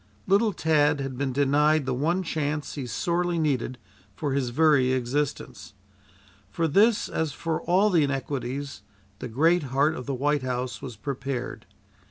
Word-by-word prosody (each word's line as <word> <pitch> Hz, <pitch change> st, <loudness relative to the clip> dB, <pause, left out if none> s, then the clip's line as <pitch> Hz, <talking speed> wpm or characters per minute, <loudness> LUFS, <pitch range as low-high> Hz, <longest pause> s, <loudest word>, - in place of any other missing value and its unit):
Little 205 Hz, +3 st, +3 dB
Tad 150 Hz, -4 st, +2 dB
had 135 Hz, -1 st, -4 dB
been 135 Hz, +1 st, -2 dB
denied 145 Hz, +2 st, +2 dB
the 130 Hz, -, -1 dB
one 165 Hz, +9 st, 0 dB
chance 150 Hz, -3 st, -2 dB
he 135 Hz, -4 st, -5 dB
sorely 175 Hz, +8 st, -1 dB
needed 135 Hz, -5 st, -1 dB, 0.4 s
for 140 Hz, +4 st, -2 dB
his 135 Hz, -3 st, 0 dB
very 135 Hz, -1 st, +3 dB
existence. 130 Hz, -3 st, -3 dB, 0.7 s
For 165 Hz, -1 st, -1 dB
this, 205 Hz, +8 st, +3 dB
as 160 Hz, -3 st, -2 dB
for 165 Hz, 0 st, -3 dB
all 195 Hz, +4 st, +3 dB
the 165 Hz, -4 st, +4 dB
inequities 140 Hz, 0 st, -3 dB, 0.4 s
the -, -, -5 dB
great 160 Hz, +9 st, +3 dB
heart 140 Hz, +4 st, +2 dB
of 125 Hz, -4 st, -7 dB
the 140 Hz, -, -1 dB
White 145 Hz, +2 st, +1 dB
House 125 Hz, 0 st, -3 dB
was 125 Hz, -4 st, -7 dB
prepared. 130 Hz, +2 st, -5 dB
145 Hz, 155 wpm, -26 LUFS, 130-160 Hz, 0.7 s, the